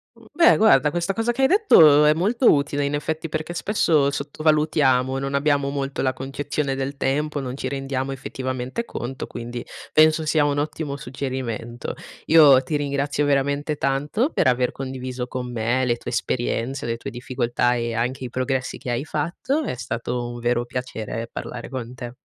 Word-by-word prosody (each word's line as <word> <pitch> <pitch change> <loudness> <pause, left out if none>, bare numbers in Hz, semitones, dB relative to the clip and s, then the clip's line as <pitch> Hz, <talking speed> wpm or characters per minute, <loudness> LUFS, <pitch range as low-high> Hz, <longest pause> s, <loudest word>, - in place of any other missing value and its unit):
Mh, 230 0 -19
beh, 335 +3 +5
guarda 150 -10 +5
questa 175 +4 -1
cosa 225 +4 0
che 240 - -3
hai 265 - +6
detto 160 - +6
è 150 - +6
molto 220 - +3
utile 145 0 +1
in 140 - -2
effetti, 160 +2 -3
perché 155 +3 -4
spesso 160 -7 +2
sottovalutiamo, 145 -3 +1
non 135 +1 -3
abbiamo 140 0 +1
molto 140 -1 -3
la 130 -1 +1
concezione 135 +1 -3
del 135 +1 -4
tempo, 150 +3 -1
non 130 -1 -5
ci 130 - -3
rendiamo 135 0 -3
effettivamente 130 - -4
conto, 130 - -5
quindi 120 0 -6 0.3
penso 155 +1 +5
sia 155 -1 +3
un 145 0 +1
ottimo 145 -1 -3
suggerimento. 125 -4 -5 0.3
Io 150 -5 +7
ti 135 +3 -3
ringrazio 145 0 0
veramente 145 +2 0
tanto 145 - 0
per - - +1
aver 125 0 +2
condiviso 130 -2 -5
con 125 -1 -5
me 120 +2 0
le 120 -1 +1
tue 120 - -7
esperienze 120 +2 -2
le 115 0 -2
tue - - -6
difficoltà 120 0 -1
e 120 -1 -2
anche 125 +4 -2
i - - -5
progressi 130 +1 -2
che 125 - -5
hai 120 +4 -2
fatto. 175 - -2
È - - -3
stato 120 0 -3
un 120 - -7
vero 120 0 0
piacere 115 -2 -5
parlare 120 -1 -7
con 125 -2 -6
te. 120 -1 -7
135 Hz, 175 wpm, -23 LUFS, 125-150 Hz, 0.3 s, Io